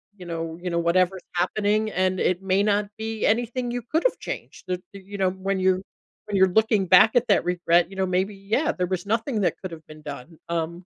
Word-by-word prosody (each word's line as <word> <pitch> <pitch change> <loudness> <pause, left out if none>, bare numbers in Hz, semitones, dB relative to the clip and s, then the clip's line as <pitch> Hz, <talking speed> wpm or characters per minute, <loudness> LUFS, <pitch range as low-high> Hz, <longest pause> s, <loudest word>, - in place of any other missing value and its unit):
you 185 -3 -11
know 165 -1 -4
you 180 - -3
know 170 - -1
whatever's 180 +2 +1
happening, 210 +4 +1
and 185 0 0
it 180 +1 0
may 190 +1 +2
not 205 -1 +1
be 220 0 -3
anything 240 +2 0
you 245 - -3
could've 320 - 0
changed - - -7
that, 180 -1 -2
you 200 +1 -9
know 190 -1 +2
when 190 +1 -2
you're 185 0 +2 0.4
when 205 -2 -2
you're 190 0 +6
looking 215 -3 +1
back 185 +6 +6
at 245 0 +3
that 200 - +3
regret, 175 -1 +2
you 195 - -11
know, 190 0 0
maybe, 190 +2 0
yeah, 210 +10 0
there 180 - -1
was 185 0 -3
nothing 225 +1 0
that 185 - +1
could've 165 -4 -7
been 155 0 -12
done. 145 +2 -8
Um, 170 +1 -3
190 Hz, 215 wpm, -24 LUFS, 180-215 Hz, 0.4 s, you're